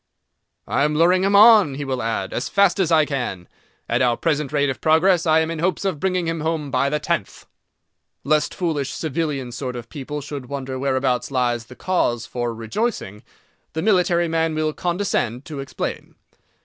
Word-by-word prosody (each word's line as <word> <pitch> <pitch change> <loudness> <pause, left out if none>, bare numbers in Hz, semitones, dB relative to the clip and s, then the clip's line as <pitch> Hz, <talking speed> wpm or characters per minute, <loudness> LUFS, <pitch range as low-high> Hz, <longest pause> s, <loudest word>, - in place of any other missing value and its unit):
"I 140 - +1
am 150 +1 +1
luring 180 +4 +4
him 200 +1 +2
on," 210 - +7
he 145 +1 -4
will 130 -2 -2
add, 110 -4 -2
"as 125 - -2
fast 200 -1 +3
as 175 -3 +1
I 155 -2 +5
can. 125 -11 -4 0.4
At - - 0
our 120 -2 +2
present 150 -3 -1
rate 145 -2 +1
of - - -8
progress, 170 +2 +3
I 160 0 +5
am 160 +1 -2
in 165 - -4
hopes 180 +2 -1
of 185 -6 -1
bringing 185 0 0
him 165 0 -2
home 155 -3 -2
by 135 +1 +1
the 150 - 0
tenth." 150 - -3 0.8
Lest 150 +1 +1
foolish 155 -6 -2
civilian 150 -5 -3
sort 125 +1 -5
of 120 -2 -8
people 145 +1 -6
should 140 -2 -7
wonder 135 -1 -5
whereabouts 130 -2 0
lies 120 -3 -1
the 125 - -12
cause 120 - 0
for 120 -1 -3
rejoicing, 115 - -3 0.5
the 160 - -2
military 180 -4 +3
man 165 -1 0
will 155 0 0
condescend 170 - -2
to 155 -4 -7
explain. 135 -1 -5
150 Hz, 185 wpm, -22 LUFS, 130-170 Hz, 0.8 s, on